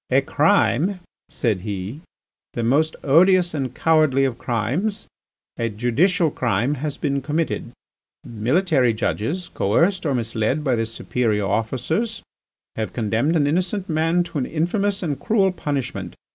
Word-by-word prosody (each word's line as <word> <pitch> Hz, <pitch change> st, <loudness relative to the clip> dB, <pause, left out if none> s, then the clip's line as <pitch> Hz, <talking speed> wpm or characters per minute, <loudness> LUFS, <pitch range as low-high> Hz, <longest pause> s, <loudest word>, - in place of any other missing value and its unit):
"A -, -, +4 dB
crime," 180 Hz, -, +2 dB, 0.3 s
said 110 Hz, -8 st, -1 dB
he, 100 Hz, -, -5 dB, 0.5 s
"the 120 Hz, -, -1 dB
most 150 Hz, +7 st, +2 dB
odious 175 Hz, +4 st, +4 dB
and 135 Hz, -5 st, -3 dB
cowardly 155 Hz, -4 st, +3 dB
of 130 Hz, -3 st, -3 dB
crimes, 135 Hz, -, -2 dB, 0.5 s
a 115 Hz, 0 st, 0 dB
judicial 150 Hz, -, +1 dB
crime, 120 Hz, +2 st, 0 dB
has 150 Hz, -2 st, -3 dB
been 140 Hz, -2 st, -1 dB
committed. 150 Hz, -3 st, -2 dB, 0.5 s
Military 130 Hz, -, +1 dB
judges, 145 Hz, -, -2 dB
coerced 175 Hz, -, +2 dB
or 140 Hz, -, +1 dB
misled 115 Hz, +4 st, -1 dB
by 135 Hz, -4 st, +1 dB
their 115 Hz, -1 st, 0 dB
superior 110 Hz, -2 st, -1 dB
officers, 130 Hz, -, -1 dB, 0.5 s
have 110 Hz, -1 st, -3 dB
condemned 115 Hz, +8 st, 0 dB
an 150 Hz, -3 st, +3 dB
innocent 185 Hz, +6 st, 0 dB
man 165 Hz, +2 st, +2 dB
to 170 Hz, -3 st, -5 dB
an 130 Hz, -, -2 dB
infamous 195 Hz, +5 st, -1 dB
and 145 Hz, -5 st, -2 dB
cruel 195 Hz, +1 st, +2 dB
punishment. 130 Hz, -, -4 dB
140 Hz, 135 wpm, -22 LUFS, 115-170 Hz, 0.5 s, A